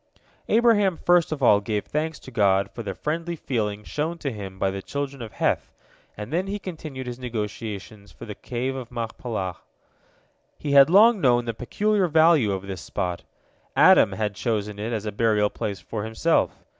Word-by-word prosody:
" -, -, -34 dB
Abraham 215 Hz, -6 st, +4 dB
first 175 Hz, -2 st, +3 dB
of 145 Hz, -3 st, -3 dB
all 105 Hz, -4 st, +6 dB
gave 105 Hz, 0 st, -3 dB
thanks 155 Hz, +1 st, -2 dB
to 130 Hz, -, -11 dB
God 100 Hz, -3 st, +2 dB
for 120 Hz, -, -7 dB
the 100 Hz, -4 st, -5 dB
friendly 165 Hz, -, -3 dB
feeling 105 Hz, -8 st, -3 dB
shown 155 Hz, +8 st, -3 dB
to 140 Hz, -4 st, -3 dB
him 100 Hz, -4 st, -8 dB
by 95 Hz, 0 st, 0 dB
the 95 Hz, 0 st, -5 dB
children 140 Hz, +2 st, -5 dB
of 110 Hz, -2 st, -8 dB
Heth, -, -, -1 dB, 0.5 s
and 105 Hz, +7 st, -7 dB
then 180 Hz, +3 st, 0 dB
he 200 Hz, +1 st, -2 dB
continued 155 Hz, -9 st, -7 dB
his 125 Hz, 0 st, -6 dB
negotiations 105 Hz, -3 st, -6 dB
for -, -, -11 dB
the 105 Hz, -, -6 dB
Cave 125 Hz, +5 st, -4 dB
of 125 Hz, -3 st, -6 dB
Machpelah. 115 Hz, -5 st, -4 dB, 1.0 s
He 145 Hz, -, -4 dB
had 140 Hz, +1 st, +7 dB
long 210 Hz, +3 st, +6 dB
known 120 Hz, -3 st, +3 dB
the 115 Hz, -, -2 dB
peculiar 200 Hz, -, 0 dB
value 160 Hz, -8 st, +4 dB
of 95 Hz, -1 st, -3 dB
this 95 Hz, -3 st, -6 dB
spot. 90 Hz, -3 st, -4 dB, 0.5 s
Adam -, -, +6 dB
had 105 Hz, -2 st, -2 dB
chosen 105 Hz, -2 st, -2 dB
it 110 Hz, +3 st, -3 dB
as 110 Hz, -2 st, -3 dB
a 105 Hz, -, -2 dB
burial 105 Hz, -1 st, +2 dB
place 100 Hz, -2 st, -4 dB
for 110 Hz, -2 st, -5 dB
himself. 110 Hz, +9 st, +1 dB
120 Hz, 185 wpm, -24 LUFS, 105-155 Hz, 1.0 s, had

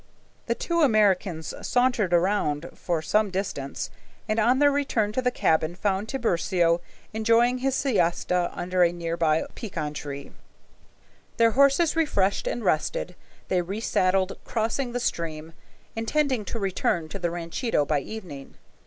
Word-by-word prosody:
The -, -, +1 dB
two 340 Hz, -1 st, -1 dB
Americans 195 Hz, -, +2 dB
sauntered 245 Hz, -7 st, +1 dB
around 175 Hz, -3 st, +1 dB
for 170 Hz, -3 st, -2 dB
some 210 Hz, +5 st, +2 dB
distance, 180 Hz, -8 st, -4 dB, 0.4 s
and 215 Hz, +1 st, 0 dB
on 240 Hz, +4 st, +4 dB
their 290 Hz, +1 st, +5 dB
return 270 Hz, -7 st, 0 dB
to 255 Hz, -, -1 dB
the 250 Hz, -, +2 dB
cabin 160 Hz, -7 st, +1 dB
found 195 Hz, +2 st, -1 dB
Tiburcio 175 Hz, -8 st, +1 dB, 0.3 s
enjoying 230 Hz, +3 st, +3 dB
his 265 Hz, +1 st, 0 dB
siesta 180 Hz, -7 st, +1 dB
under 180 Hz, +1 st, -1 dB
a 170 Hz, -, +4 dB
near 170 Hz, -1 st, -3 dB
by 160 Hz, -2 st, +2 dB
pecan 160 Hz, -9 st, -5 dB
tree. 140 Hz, -2 st, -7 dB, 1.1 s
Their 230 Hz, 0 st, +5 dB
horses 280 Hz, +6 st, +4 dB
refreshed 200 Hz, -12 st, +1 dB
and 235 Hz, -, -3 dB
rested, 180 Hz, +2 st, 0 dB, 0.3 s
they 180 Hz, -1 st, +1 dB
resaddled, 190 Hz, -1 st, 0 dB
crossing 235 Hz, +3 st, -2 dB
the 245 Hz, -, -1 dB
stream, 165 Hz, -6 st, -3 dB, 0.4 s
intending 255 Hz, 0 st, 0 dB
to 230 Hz, -, -4 dB
return 185 Hz, -5 st, -1 dB
to 195 Hz, -, -6 dB
the 175 Hz, -1 st, 0 dB
ranchito 170 Hz, -, -1 dB
by 150 Hz, 0 st, +1 dB
evening. 145 Hz, -5 st, -9 dB
195 Hz, 140 wpm, -26 LUFS, 170-235 Hz, 1.1 s, their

